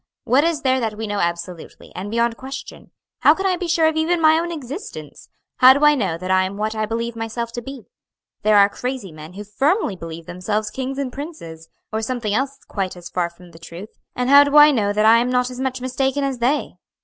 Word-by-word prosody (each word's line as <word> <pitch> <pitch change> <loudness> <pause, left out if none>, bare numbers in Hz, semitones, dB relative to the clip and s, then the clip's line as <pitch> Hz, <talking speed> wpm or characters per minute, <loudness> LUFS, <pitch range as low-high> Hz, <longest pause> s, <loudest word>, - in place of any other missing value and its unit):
What 265 +5 +3
is 325 -2 -1
there 260 -1 +2
that 220 -3 -3
we 225 - -4
know 205 -1 -3
absolutely, 170 -1 -5
and 190 +3 -6
beyond 235 +1 0
question? 265 +3 -9 0.3
how - - +5
can 385 - -4
I 375 -1 +2
be 355 0 -4
sure 330 -1 +2
of 315 - 0
even 325 +2 +1
my 315 0 +5
own 340 +1 -3
existence? 300 - -8 0.3
how 255 0 +8
do 290 +1 +2
I 295 - +7
know 195 - -1
that 185 +2 -4
I 185 0 +4
am 190 +2 -5
what 215 +1 -2
I 215 -1 -2
believe 230 +1 -3
myself 230 +1 -4
to 240 - -5
be? 270 0 -9 0.6
There 215 -1 +4
are 200 0 +7
crazy 245 -2 -5
men 155 +2 -11
who 205 +2 -7
firmly 270 - 0
believe 165 -1 -9
themselves 210 +5 -3
kings 265 +1 -4
and 270 -3 -3
princes, 170 - -9 0.2
or 220 - -1
something 225 -2 -2
else 270 +4 -1
quite 190 -3 -4
as 175 -1 -10
far 175 -1 -1
from 175 0 -17
the 165 - -15
truth; 170 +5 -10 0.3
and 250 0 -1
how 280 +1 +8
do 285 +1 +2
I 295 0 +9
know 210 -7 +1
that 210 +1 +1
I 225 +1 +7
am 245 +1 0
not 250 0 0
as 250 - -8
much 260 -1 -3
mistaken 265 +2 -1
as 270 -3 -2
they?" 260 +5 -1
235 Hz, 235 wpm, -21 LUFS, 200-275 Hz, 0.6 s, I